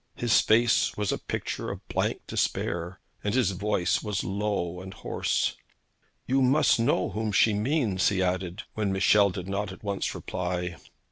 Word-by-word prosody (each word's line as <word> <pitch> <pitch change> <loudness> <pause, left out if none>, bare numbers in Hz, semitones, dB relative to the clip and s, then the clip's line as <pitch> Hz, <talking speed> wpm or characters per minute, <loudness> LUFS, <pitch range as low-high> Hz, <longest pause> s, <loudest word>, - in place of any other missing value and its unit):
His 120 -2 +3
face 115 +2 +3
was 105 -2 0
a - - -2
picture - - -4
of - - -7
blank - - -1
despair, 85 +2 -2 0.2
and 105 +2 0
his 125 -7 +3
voice 95 -1 0
was 105 -3 -2
low 95 -3 -2
and 95 0 -9
hoarse. - - -1 0.7
'You 135 +2 +2
must 135 0 +4
know 115 -6 +1
whom 110 0 -2
she 105 +2 +4
means,' 105 - +1
he 95 - -1
added, 90 +1 -2
when 105 -2 -1
Michel 100 +1 +4
did 90 0 -6
not 100 0 -2
at 95 - -12
once 100 -1 -2
reply. 90 -1 -3
100 Hz, 160 wpm, -27 LUFS, 95-110 Hz, 0.7 s, must